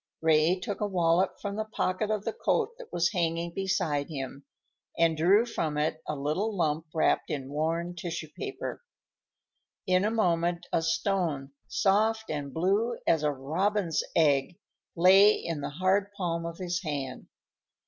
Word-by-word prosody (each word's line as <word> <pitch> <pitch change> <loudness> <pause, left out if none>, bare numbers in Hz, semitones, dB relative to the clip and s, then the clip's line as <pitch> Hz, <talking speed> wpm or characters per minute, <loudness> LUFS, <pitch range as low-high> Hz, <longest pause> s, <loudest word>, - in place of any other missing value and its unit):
Ray 160 +3 +3
took 200 +3 -5
a 210 - +1
wallet 180 -1 +1
from 200 0 -4
the 220 - 0
pocket 215 -1 -2
of 215 -2 -1
the 225 - -1
coat 465 - 0
that - - -11
was 175 0 +1
hanging 170 -2 -1
beside 170 -7 -1
him, 140 -2 -6 0.5
and 165 -1 +3
drew 190 +8 +4
from 160 -10 -2
it 155 +1 -1
a 155 - -2
little 180 +10 -1
lump 160 -1 0
wrapped 160 - +1
in 135 -2 -4
worn 165 +4 -1
tissue 170 -2 -5
paper. 405 -1 -5 1.0
In 185 0 +3
a 210 - +2
moment 175 -5 +1
a 165 - +3
stone, 165 -4 -1 0.2
soft 220 +2 +1
and 145 -2 -4
blue 200 - +1
as 165 -2 +3
a 150 - +2
robin's 165 +6 0
egg, 150 +1 +3 0.4
lay 190 +4 +7
in 165 -3 -4
the - - -3
hard 190 +6 +1
palm 170 -3 -2
of 170 0 -7
his 180 -2 -2
hand. 140 -6 -4
170 Hz, 160 wpm, -28 LUFS, 155-195 Hz, 1.0 s, lay